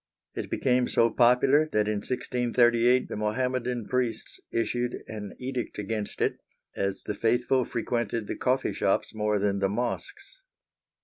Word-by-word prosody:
It - - -5
became 125 -1 +2
so 115 0 +3
popular 130 +6 +4
that 105 -1 +2
in 105 -1 0
1638 120 +1 +2
the - - -5
Mohammedan 125 +2 -1
priests 125 -2 -2
issued 120 +1 -1
an 105 -2 -7
edict 125 -1 -4
against 105 0 -4
it, - - 0 0.3
as 100 0 -2
the - - -3
faithful 120 +4 +1
frequented 115 -2 -2
the - - -4
coffee 130 +1 0
shops - - 0
more 105 -1 0
than 100 0 0
the 95 0 +1
mosques. 395 - -4
120 Hz, 140 wpm, -27 LUFS, 105-125 Hz, 0.3 s, popular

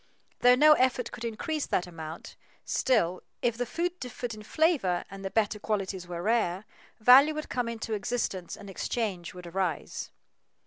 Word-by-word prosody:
Though 245 0 +7
no 305 +4 +7
effort 255 -3 +1
could 230 - -8
increase 275 +7 -2
that 180 - 0
amount, 165 -2 -8 0.3
still, 185 -8 +1 0.2
if 240 -2 +2
the 245 +1 -2
food 350 +6 -2
differed 245 -2 -5
in 215 - -9
flavor 235 - +1
and 195 0 -8
the 195 - -2
better 210 0 0
qualities 195 -4 -2
were 175 -1 -5
rare, 210 -3 +1 0.3
value 270 +7 +7
would 305 - -5
come 245 -2 -1
into 225 -1 -4
existence 205 -4 -2
and - - -11
exchange 195 -3 -3
would 180 -1 -9
arise. 175 -2 -3
220 Hz, 165 wpm, -29 LUFS, 185-250 Hz, 0.3 s, Though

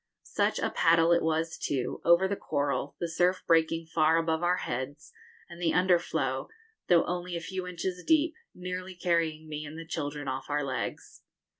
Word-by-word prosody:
Such - - +2
a - - -1
paddle 165 0 +4
it 170 - +4
was, 160 0 -1
too, 130 -3 -2
over 170 +3 +5
the 200 - -1
coral, 145 -6 -2
the 170 - -1
surf 180 +3 +1
breaking 165 0 +2
far 160 0 +3
above 160 0 0
our 175 +1 +3
heads, 130 +3 -5 0.3
and 170 0 -11
the 165 -2 +2
underflow, 180 -1 +1 0.4
though 170 -2 +5
only 180 0 -3
a - - -1
few 185 +2 -5
inches 180 0 -4
deep, 320 0 +3 0.2
nearly 180 +1 -5
carrying 165 -3 0
me 150 -1 -5
and 155 +1 -8
the 165 - -7
children 145 -2 -4
off 130 +2 -4
our 145 0 0
legs! 130 -2 -5
165 Hz, 175 wpm, -29 LUFS, 155-180 Hz, 0.4 s, over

